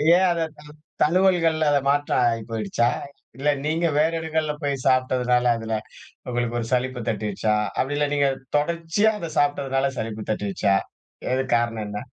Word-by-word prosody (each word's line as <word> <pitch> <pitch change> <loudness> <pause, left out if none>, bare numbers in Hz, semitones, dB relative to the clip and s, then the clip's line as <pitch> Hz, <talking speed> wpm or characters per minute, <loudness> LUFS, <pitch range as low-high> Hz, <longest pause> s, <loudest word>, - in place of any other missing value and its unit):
ஏன் 185 +1 +4
அத 170 -1 -1 0.2
த - - -12 0.4
தழுவல்கள்ல 165 -2 +3
அத 145 - +4
மாற்ற 145 +1 +1 0.2
ஆயிப்போயிடுச்சா? 115 0 -1 0.5
இல்ல 140 +2 0 0.2
நீங்க 165 +2 +1
வேற 155 +2 +3
இடங்கள்ல 160 -1 -1
போய் 140 -1 0
சாப்டதுனால 125 -1 +2
அதுல 115 0 -4 0.6
உங்களுக்கு 120 -1 -1
ஒரு 115 - -4
சலிப்பு 125 0 0
தட்டிடுச்சா? 105 0 -1 0.2
அப்டில்ல 145 +2 0
நீங்கத் 140 -2 +1
தொடர்ச்சியா 170 +7 +1
அத 170 - -5
சாப்டதுனால 140 -2 +1
சலிப்பு 110 -1 -4
தட்டிடுச்சா? 100 -1 0 0.6
எதுக் 130 -1 0
காரணம் 115 -2 -1
என்ன? 105 0 -5
135 Hz, 140 wpm, -24 LUFS, 115-155 Hz, 0.6 s, ஏன்